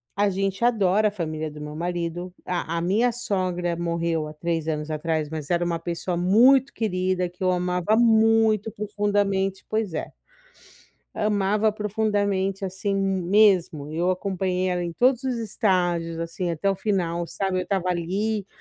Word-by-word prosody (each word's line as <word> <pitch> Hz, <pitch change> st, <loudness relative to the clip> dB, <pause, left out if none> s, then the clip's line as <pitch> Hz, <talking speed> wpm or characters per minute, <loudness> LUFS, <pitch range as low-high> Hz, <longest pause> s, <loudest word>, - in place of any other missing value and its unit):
a 205 Hz, +1 st, +2 dB
gente 195 Hz, +2 st, -2 dB
adora 215 Hz, -3 st, +3 dB
a -, -, -1 dB
família 155 Hz, -5 st, -4 dB
do 150 Hz, 0 st, -10 dB
meu 150 Hz, 0 st, -7 dB
marido, 175 Hz, +1 st, -3 dB
a 170 Hz, -2 st, -2 dB
a -, -, -1 dB
minha 210 Hz, +8 st, +2 dB
sogra 185 Hz, -6 st, -1 dB
morreu 170 Hz, -2 st, -1 dB
há 150 Hz, -, -8 dB
3 165 Hz, 0 st, -2 dB
anos 155 Hz, -1 st, -2 dB
atrás, 155 Hz, 0 st, -1 dB
mas 155 Hz, -2 st, -6 dB
era 175 Hz, 0 st, +1 dB
uma 170 Hz, -1 st, -1 dB
pessoa 170 Hz, +2 st, -3 dB
muito 245 Hz, +10 st, +5 dB
querida, 185 Hz, -4 st, -1 dB
que 180 Hz, +2 st, -9 dB
eu 185 Hz, -, +3 dB
amava 180 Hz, +3 st, +1 dB
muito 225 Hz, -1 st, +4 dB
profundamente, 200 Hz, -2 st, -1 dB
pois 215 Hz, -5 st, -1 dB
é. 155 Hz, -, -4 dB, 1.0 s
Amava 210 Hz, +1 st, +1 dB
profundamente, 205 Hz, -2 st, -1 dB
assim, 190 Hz, +2 st, -2 dB
mesmo. 190 Hz, -5 st, +2 dB
Eu 170 Hz, +4 st, 0 dB
acompanhei 185 Hz, -1 st, -1 dB
ela 180 Hz, -1 st, -1 dB
em 170 Hz, -, -4 dB
todos 250 Hz, +6 st, +2 dB
os 255 Hz, -2 st, -1 dB
estágios, 180 Hz, -7 st, 0 dB
assim, 165 Hz, +2 st, -3 dB
até 170 Hz, +4 st, -1 dB
o -, -, 0 dB
final, 175 Hz, -4 st, -1 dB
sabe. 190 Hz, +1 st, -2 dB
Eu -, -, 0 dB
estava 185 Hz, 0 st, -1 dB
ali, 195 Hz, +4 st, -1 dB
185 Hz, 160 wpm, -24 LUFS, 170-205 Hz, 1.0 s, muito